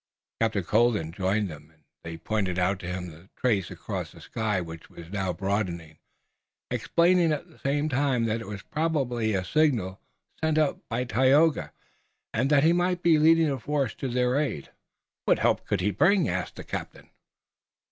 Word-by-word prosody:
Captain 110 Hz, -4 st, +1 dB
Colden 105 Hz, -5 st, +2 dB
joined 95 Hz, +4 st, 0 dB
them, 75 Hz, -2 st, -11 dB
and 80 Hz, -1 st, -30 dB, 0.2 s
they 85 Hz, 0 st, -6 dB
pointed 100 Hz, -4 st, -2 dB
out 90 Hz, +1 st, +1 dB
to 90 Hz, -, -7 dB
him 90 Hz, -1 st, -4 dB
the 80 Hz, +5 st, -16 dB
trace 105 Hz, -8 st, +1 dB
across -, -, -5 dB
the -, -, -15 dB
sky 110 Hz, -4 st, -2 dB
which 80 Hz, -2 st, -8 dB
was 85 Hz, +1 st, -12 dB
now 95 Hz, -2 st, -1 dB
broadening, 90 Hz, -4 st, -3 dB, 0.7 s
explaining 170 Hz, -1 st, +3 dB
at 150 Hz, +3 st, -3 dB
the 165 Hz, -, -21 dB
same 145 Hz, +2 st, 0 dB
time 135 Hz, -4 st, +1 dB
that 115 Hz, +1 st, -1 dB
it 115 Hz, -, -9 dB
was 105 Hz, -1 st, -7 dB
probably 130 Hz, -9 st, -1 dB
a 90 Hz, -1 st, -1 dB
signal 120 Hz, -12 st, +1 dB, 0.4 s
sent 160 Hz, -1 st, +2 dB
up 155 Hz, -3 st, +2 dB
by 125 Hz, -, -1 dB
Tayoga, 135 Hz, +6 st, +3 dB, 0.6 s
and 130 Hz, +5 st, +1 dB
that 145 Hz, -1 st, +4 dB
he 165 Hz, +2 st, +5 dB
might 175 Hz, 0 st, 0 dB
be 165 Hz, -3 st, +5 dB
leading 160 Hz, 0 st, +5 dB
a 135 Hz, -, -3 dB
force 140 Hz, 0 st, -1 dB
to 135 Hz, -, -5 dB
their 125 Hz, +1 st, +1 dB
aid. 135 Hz, -, -3 dB, 0.5 s
"What -, -, +4 dB
help -, -, +1 dB
could -, -, 0 dB
he 105 Hz, +3 st, +1 dB
bring?" 185 Hz, -, +3 dB
asked -, -, -3 dB
the -, -, -8 dB
captain. -, -, -7 dB
115 Hz, 175 wpm, -27 LUFS, 95-150 Hz, 0.7 s, he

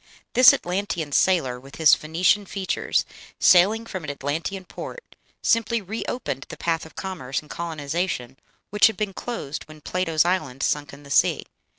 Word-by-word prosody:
This 255 Hz, 0 st, +9 dB
Atlantean 175 Hz, -4 st, -2 dB
sailor, 140 Hz, -7 st, +2 dB
with 135 Hz, +2 st, -13 dB
his 160 Hz, -3 st, +6 dB
Phoenician 180 Hz, +6 st, +2 dB
features, 190 Hz, -1 st, -1 dB, 0.3 s
sailing 205 Hz, +6 st, +5 dB
from 185 Hz, -6 st, -6 dB
an 150 Hz, -, -5 dB
Atlantean 160 Hz, +7 st, -3 dB
port, 480 Hz, -, -9 dB, 0.3 s
simply 230 Hz, 0 st, +2 dB
re 215 Hz, +3 st, -5 dB
opened 135 Hz, -, -4 dB
the -, -, -8 dB
path 165 Hz, -1 st, -1 dB
of 155 Hz, -, -19 dB
commerce 160 Hz, -9 st, -4 dB
and 150 Hz, -, -14 dB
colonization 155 Hz, -5 st, -3 dB, 0.3 s
which 210 Hz, +1 st, +6 dB
had 220 Hz, -, -4 dB
been 210 Hz, -2 st, -2 dB
closed 170 Hz, -, -5 dB
when 155 Hz, 0 st, -13 dB
Plato's 165 Hz, 0 st, 0 dB
island 155 Hz, -8 st, -1 dB
sunk 145 Hz, -2 st, 0 dB
in 140 Hz, +1 st, -13 dB
the 140 Hz, -, -12 dB
sea. 145 Hz, -, +3 dB
170 Hz, 165 wpm, -24 LUFS, 145-195 Hz, 0.3 s, This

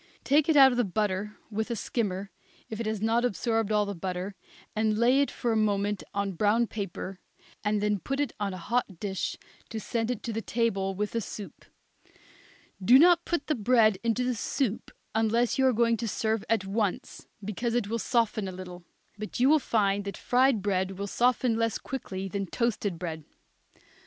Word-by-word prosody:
Take 295 Hz, +3 st, +3 dB
it 310 Hz, -, +5 dB
out 270 Hz, -1 st, +9 dB
of 245 Hz, -, -1 dB
the -, -, +4 dB
butter 210 Hz, +1 st, -2 dB
with 220 Hz, +3 st, -2 dB
a 235 Hz, -, -1 dB
skimmer, 200 Hz, -4 st, -2 dB, 0.4 s
if 220 Hz, -, -4 dB
it 230 Hz, -, -2 dB
has 215 Hz, -1 st, -2 dB
not 230 Hz, +2 st, +2 dB
absorbed 225 Hz, -2 st, 0 dB
all 210 Hz, -1 st, +3 dB
the 200 Hz, -, -4 dB
butter, 185 Hz, +2 st, -4 dB, 0.4 s
and 215 Hz, 0 st, +1 dB
lay 250 Hz, +4 st, +4 dB
it 280 Hz, -, +1 dB
for 240 Hz, -, -2 dB
a -, -, +1 dB
moment 205 Hz, -2 st, +1 dB
on 200 Hz, 0 st, -1 dB
brown 210 Hz, +6 st, +2 dB
paper, 195 Hz, -3 st, -5 dB, 0.4 s
and 210 Hz, 0 st, +1 dB
then 210 Hz, -1 st, +1 dB
put 275 Hz, +8 st, -3 dB
it 290 Hz, -4 st, 0 dB
on 205 Hz, -1 st, -1 dB
a 185 Hz, -, -6 dB
hot 200 Hz, -1 st, -2 dB
dish 190 Hz, -3 st, -3 dB, 0.3 s
to 225 Hz, -, -4 dB
send 230 Hz, +1 st, -2 dB
to 230 Hz, -, -3 dB
the 225 Hz, -, -2 dB
table 195 Hz, -5 st, 0 dB
with 210 Hz, +2 st, -2 dB
the 230 Hz, -, -1 dB
soup. 200 Hz, -4 st, -8 dB, 1.2 s
Do 245 Hz, +7 st, +8 dB
not 340 Hz, +3 st, +6 dB
put 345 Hz, -4 st, -1 dB
the 310 Hz, -, +1 dB
bread 220 Hz, -4 st, +3 dB
into 235 Hz, +2 st, +1 dB
the 250 Hz, 0 st, 0 dB
soup 230 Hz, 0 st, -2 dB, 0.2 s
unless 225 Hz, +3 st, +1 dB
you 265 Hz, -, +5 dB
are -, -, +5 dB
going 230 Hz, 0 st, +2 dB
to 230 Hz, -, -3 dB
serve 220 Hz, 0 st, -1 dB
at 220 Hz, -4 st, +1 dB
once, 200 Hz, 0 st, -2 dB, 0.2 s
because 230 Hz, +3 st, -2 dB
it 240 Hz, -4 st, +1 dB
will 230 Hz, +2 st, -2 dB
soften 225 Hz, -4 st, +1 dB
a -, -, -4 dB
little; 180 Hz, -1 st, -9 dB, 0.4 s
but 215 Hz, +2 st, -5 dB
you 255 Hz, +3 st, +5 dB
will 310 Hz, +1 st, +6 dB
find 205 Hz, -6 st, +1 dB
that 200 Hz, -, -5 dB
fried 250 Hz, -4 st, +2 dB
bread 190 Hz, -2 st, 0 dB
will 200 Hz, -, -3 dB
soften 240 Hz, +2 st, +2 dB
less 230 Hz, -2 st, 0 dB
quickly 195 Hz, -7 st, -5 dB
than 195 Hz, 0 st, -3 dB
toasted 210 Hz, -4 st, -1 dB
bread. 165 Hz, -2 st, -5 dB
220 Hz, 195 wpm, -28 LUFS, 200-235 Hz, 1.2 s, out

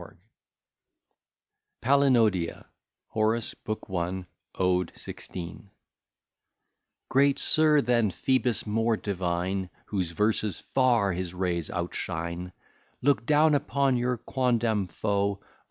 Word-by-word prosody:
B._] -, -, -13 dB, 1.6 s
PALINODIA 115 Hz, -10 st, +3 dB, 0.4 s
HORACE, 110 Hz, +1 st, 0 dB
BOOK 110 Hz, 0 st, -6 dB
I, 90 Hz, +2 st, -2 dB, 0.3 s
ODE 90 Hz, -1 st, +1 dB
XVI 90 Hz, +2 st, -8 dB, 1.4 s
Great 140 Hz, +1 st, +3 dB
Sir, 155 Hz, -1 st, +4 dB
than 120 Hz, -3 st, +2 dB
Phoebus 125 Hz, +1 st, 0 dB
more 115 Hz, +1 st, +1 dB
divine, 95 Hz, -1 st, -2 dB, 0.2 s
Whose 95 Hz, -5 st, -2 dB
verses 105 Hz, 0 st, 0 dB
far 120 Hz, -7 st, +2 dB
his 90 Hz, 0 st, -4 dB
rays 90 Hz, -3 st, -1 dB
outshine, 85 Hz, 0 st, -4 dB, 0.5 s
Look 140 Hz, -4 st, +2 dB
down 150 Hz, +1 st, +5 dB
upon 140 Hz, -2 st, +1 dB
your 125 Hz, 0 st, 0 dB
quondam 115 Hz, -5 st, 0 dB
foe; 100 Hz, +1 st, -1 dB
O! -, -, -31 dB
105 Hz, 100 wpm, -27 LUFS, 90-125 Hz, 1.6 s, down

